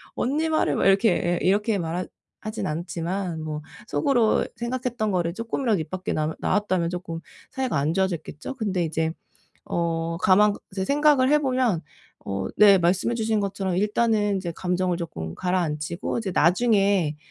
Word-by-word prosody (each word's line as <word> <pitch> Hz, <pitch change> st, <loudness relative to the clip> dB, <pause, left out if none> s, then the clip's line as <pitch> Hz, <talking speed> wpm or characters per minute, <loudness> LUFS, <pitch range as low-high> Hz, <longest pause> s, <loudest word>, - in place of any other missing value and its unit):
언니 305 Hz, +6 st, 0 dB
말을 315 Hz, -, +1 dB
왜 -, -, +2 dB
이렇게." 200 Hz, +3 st, +4 dB
에 175 Hz, 0 st, 0 dB
이렇게 205 Hz, +3 st, +2 dB
말하 175 Hz, +1 st, -2 dB, 0.4 s
하진 215 Hz, +1 st, -4 dB
않지만 170 Hz, +2 st, -3 dB
뭐 155 Hz, -1 st, -4 dB, 0.3 s
속으로 245 Hz, -7 st, +2 dB
생각했던 235 Hz, -3 st, -2 dB
거를 170 Hz, -2 st, 0 dB
쪼끔이라도 230 Hz, 0 st, -1 dB
입 155 Hz, -1 st, -5 dB
밖에 185 Hz, +2 st, -4 dB
남아 155 Hz, +1 st, -1 dB
나왔다면 185 Hz, -4 st, 0 dB
쪼끔 175 Hz, -2 st, -5 dB, 0.3 s
사이가 260 Hz, -, -1 dB
안 145 Hz, +3 st, +1 dB
좋아졌겠죠? 180 Hz, -, -3 dB
근데 200 Hz, -7 st, -1 dB
이제 160 Hz, 0 st, -1 dB, 0.5 s
어, 165 Hz, -1 st, -1 dB
가만 205 Hz, +2 st, +5 dB, 0.2 s
생각을 280 Hz, +6 st, +3 dB
해 300 Hz, -, +5 dB
보면 255 Hz, -, +1 dB, 0.4 s
어 100 Hz, -1 st, -3 dB
네 200 Hz, -2 st, +7 dB
말씀해 180 Hz, +7 st, +1 dB
주신 220 Hz, -1 st, 0 dB
것처럼 195 Hz, -2 st, -2 dB
일단은 210 Hz, 0 st, +1 dB
인제 175 Hz, -3 st, -3 dB
감정을 180 Hz, -1 st, 0 dB
조금 80 Hz, -, -5 dB
가라앉히고 170 Hz, -1 st, -2 dB
이제 215 Hz, -4 st, -3 dB
나중에 195 Hz, -3 st, +3 dB
190 Hz, 335 characters per minute, -24 LUFS, 170-220 Hz, 0.5 s, 네